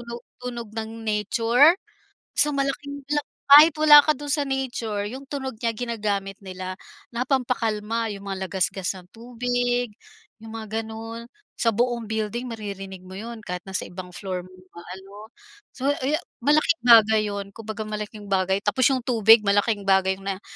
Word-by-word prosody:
tunog 235 0 -8 0.2
tunog 240 -3 -6
ng 220 0 -5
nature. 230 - +4 0.6
So, 295 - +3
malaking 280 0 -3
la 295 0 0 0.3
kahit 300 +2 +10
wala 295 -1 +9
ka 305 - +1
do'n 290 -1 -3
sa 295 - 0
nature, 240 -7 -3
'yong 265 +5 -8
tunog 265 -3 -4
niya 230 - +2
ginagamit 205 -5 -3
nila 185 0 -6 0.4
na 240 - -1
pampakalma. 230 -4 -1
'Yong 200 0 -8
mga 190 -2 -4
lagasgas 190 0 -1
ng 180 - -15
tubig, 245 0 -2 0.5
'yong 225 - -10
mga 220 +1 -4
gano'n. 225 +2 -8 0.3
Sa 230 - +4
buong 235 0 -1
building 220 +3 -3
maririnig 195 -4 -7
mo 185 - -10
'yon 230 +3 -7
kahit 180 -1 -5
nasa 190 - -3
ibang 180 0 -9
floor 180 0 -5
mo 185 - -16 0.2
maano. 195 +5 -11 0.4
So, 265 +1 -5 0.2
ayo 300 +4 +1 0.2
malaking 305 +3 +3
bagay 220 -2 +7
'yon, 200 -1 -4
kumbaga 220 -1 -6
malaking 210 0 -6
bagay 190 0 +1
tapos 210 +6 +3
'yong 255 -3 -1
tubig, 225 -2 +6
malaking 205 0 +1
bagay 190 0 +3
na 195 0 -5
225 Hz, 160 wpm, -24 LUFS, 200-245 Hz, 0.6 s, kahit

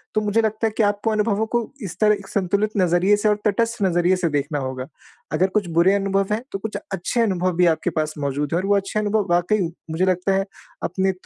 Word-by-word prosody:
तो 215 - +3
मुझे 210 +2 +2
लगता 220 0 0
है - - -2
कि 225 - +3
आपको 205 +2 +1
अनुभवों 215 0 +1
को 240 - +4 0.2
इस 185 -3 -6
तरह 210 -1 +5
एक 200 -1 -11
संतुलित 200 +2 0
नज़रिए 180 +2 +3
से 210 - 0
और 210 - +3
तटस्थ 230 +2 0
नज़रिए 175 0 +3
से 175 -2 0
देखना 145 0 -1
होगा 130 -1 -4 0.5
अगर 185 - +3
कुछ 205 -4 +1
बुरे 180 +3 +5
अनुभव 195 0 0
हैं 215 - -1
तो 195 - -2
कुछ 215 +2 -4 0.2
अच्छे 195 +6 -1
अनुभव 185 -4 +1
भी 180 - +5
आपके 160 +3 -2
पास 155 0 0
मौजूद 140 +1 -2
हैं - - +2
और 185 - -3
वो 205 - +4
अच्छे 200 +2 -2
अनुभव 210 -1 0
वाक़ई 175 +5 +2 0.3
मुझे 165 +4 +1
लगता 185 +1 +1
है 195 0 +1 0.4
अपने 190 0 0
195 Hz, 230 wpm, -22 LUFS, 175-210 Hz, 0.5 s, तरह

